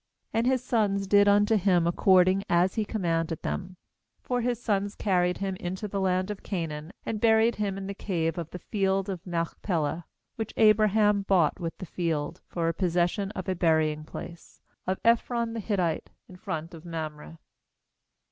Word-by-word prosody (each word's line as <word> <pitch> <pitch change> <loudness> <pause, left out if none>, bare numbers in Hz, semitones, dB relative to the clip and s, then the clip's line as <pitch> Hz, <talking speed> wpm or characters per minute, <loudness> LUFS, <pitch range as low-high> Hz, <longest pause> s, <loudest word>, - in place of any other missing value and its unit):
12And 225 +1 +1
his 255 -1 +2
sons 205 -5 +1
did 205 +1 +5
unto 205 +2 +4
him 180 -3 +3
according 185 +2 +4
as 175 +2 +3
he 220 - 0
commanded 165 -6 -1
them. 185 -1 -4 0.5
13For 245 -1 0
his 240 -1 -1
sons 205 -3 -1
carried 180 -3 +1
him 195 -1 -2
into 185 +4 -4
the 200 -1 -3
land 185 +1 +1
of 205 - -7
Canaan, 160 -4 -4
and 215 -2 -3
buried 225 0 +4
him 200 -2 -1
in 195 - -5
the 200 - -4
cave 170 -5 -2
of 165 -2 -5
the 180 - -7
field 195 +1 -1
of 185 -1 -5
Machpelah, 165 -2 -2 0.3
which 220 -2 -4
Abraham 215 -1 +4
bought 185 -6 +2
with 165 -2 -4
the 185 - -7
field, 160 -4 -2
for 170 -2 -2
a 165 - +1
possession 180 +3 0
of 185 -4 -6
a 190 - +1
burying 160 -3 +1
place, 170 +2 -10 0.3
of 190 +1 0
Ephron 235 0 +2
the 230 - -3
Hittite, 185 -6 -1 0.2
in 185 - -13
front 165 -2 -5
of 165 -1 -10
Mamre. 160 -1 -6
190 Hz, 175 wpm, -27 LUFS, 170-205 Hz, 0.5 s, did